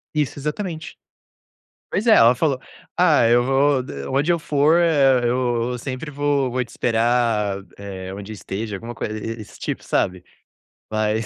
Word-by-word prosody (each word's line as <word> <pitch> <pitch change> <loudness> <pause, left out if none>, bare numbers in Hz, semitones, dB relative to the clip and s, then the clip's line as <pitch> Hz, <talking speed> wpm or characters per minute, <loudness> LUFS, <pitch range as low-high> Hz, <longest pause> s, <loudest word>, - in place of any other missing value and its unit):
Isso, 145 -2 0
exatamente. 160 +3 -4 0.9
Pois 220 - -1
é, 220 - +8
ela 115 +2 +6
falou: 135 0 0 0.4
"Ah, 160 -9 +5
eu 120 +1 +5
vou 135 0 +3
de 70 - -7
onde 145 +6 +1
eu 170 - +1
for, 150 +1 +2
eh, 140 -6 +4
eu 120 0 0
sempre 130 +4 -5
vou 145 -2 0
vou 125 +1 0
te - - -15
esperar, 115 -4 +1
eh, 95 -2 -7
onde 100 +2 -7
esteja, 105 +1 -5
alguma 115 +5 -7
coisa 110 -2 -4
e 115 +2 -5
e - - -8
esse 105 - -13
tipo, - - -4
sabe?" 90 -1 -1 0.7
Mas 110 +1 0
125 Hz, 165 wpm, -22 LUFS, 110-145 Hz, 0.9 s, é